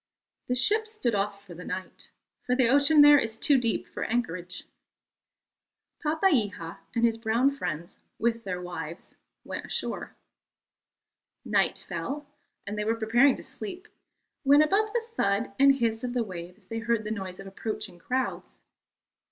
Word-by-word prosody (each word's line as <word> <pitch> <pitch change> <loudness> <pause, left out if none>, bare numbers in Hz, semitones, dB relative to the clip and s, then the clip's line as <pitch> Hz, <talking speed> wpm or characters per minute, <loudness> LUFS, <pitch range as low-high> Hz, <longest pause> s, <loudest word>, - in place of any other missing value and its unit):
The 250 - +1
ship 430 - +3
stood 430 - -1
off 200 0 -2
for 180 - -10
the 175 +2 -9
night, 185 +1 -6 0.3
for 250 - +1
the 255 -2 +4
ocean 285 +3 +6
there 290 0 +9
is 225 -2 -2
too 275 +3 +4
deep 230 -2 -1
for - - -5
anchorage. 185 -6 -2 1.4
Papeiha 255 - +1 0.2
and 235 0 +3
his 225 -1 +1
brown 230 +4 +2
friends, 170 - -5 0.2
with 230 0 0
their 180 -3 -3
wives, 170 -2 -7 0.3
went - - -6
ashore. - - -3 1.3
Night - - +1
fell, 290 +1 -4 0.4
and 205 +2 -4
they - - 0
were 225 +2 +1
preparing 235 +5 +4
to - - -8
sleep, 370 -2 -6 0.5
when, 285 +2 +6
above 415 +7 +2
the 470 0 0
thud 215 - 0
and 275 0 +7
hiss 230 -3 0
of 245 -1 -2
the 240 - +2
waves 180 0 -9
they 225 +4 -4
heard 230 -1 0
the 210 - -4
noise 190 -4 -5
of 195 - -8
approaching 200 -1 -5
crowds. 255 +8 -3
230 Hz, 155 wpm, -28 LUFS, 195-275 Hz, 1.4 s, there